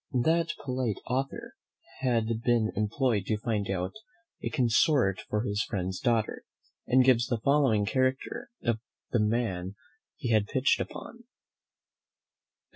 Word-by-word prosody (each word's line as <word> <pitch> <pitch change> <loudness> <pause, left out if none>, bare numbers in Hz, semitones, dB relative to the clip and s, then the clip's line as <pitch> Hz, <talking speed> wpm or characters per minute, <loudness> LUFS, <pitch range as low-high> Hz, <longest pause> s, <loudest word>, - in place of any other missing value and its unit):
That 165 +2 +2
polite 125 -5 -1
author 135 +2 -3 0.5
had 115 -3 0
been 120 -3 +2
employed 110 0 0
to 110 - +1
find 105 -2 -2
out 95 -1 -2 0.5
a - - -1
consort 120 - +3
for 105 +1 0
his 105 -3 -1
friend's 95 -1 -3
daughter, 115 -3 0 0.4
and 130 0 +5
gives 120 -2 +4
the 120 - 0
following 135 -8 +3
character 130 +3 -1
of 120 -2 +1 0.3
the 120 - +2
man 105 -4 -1 0.4
he 125 -6 -2
had 105 -2 +3
pitched 130 +2 +2
upon. 235 +1 -8
115 Hz, 125 wpm, -29 LUFS, 105-130 Hz, 0.5 s, and